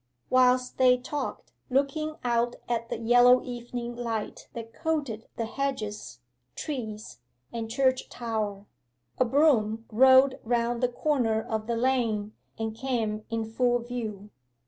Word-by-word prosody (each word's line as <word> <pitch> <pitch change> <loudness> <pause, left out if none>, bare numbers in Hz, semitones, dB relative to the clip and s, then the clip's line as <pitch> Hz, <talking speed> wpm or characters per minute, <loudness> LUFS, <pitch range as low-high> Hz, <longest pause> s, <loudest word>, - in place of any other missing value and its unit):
Whilst 255 0 +3
they 250 -1 +6
talked, 285 +4 -5 0.2
looking 280 +4 0
out 240 0 +1
at 230 -1 -2
the - - -2
yellow 245 +2 +5
evening 240 -1 -5
light 230 -3 -4
that 230 -1 -8
coated 285 -9 -2
the 230 - -2
hedges, 215 - -4 0.3
trees, 220 -7 -5 0.3
and 225 -1 -4
church 260 +1 +1
tower, 215 -4 -3 0.5
a 255 - +4
brougham 230 -5 +3
rolled 260 +3 +6
round 235 0 0
the 250 - +4
corner 245 -4 +1
of 220 0 -3
the 235 -1 0
lane, 230 -4 0 0.2
and 220 -1 -3
came 225 -4 -2
in 225 -1 -2
full 245 +2 +1
view. 225 -4 -6
240 Hz, 130 wpm, -27 LUFS, 220-255 Hz, 0.5 s, they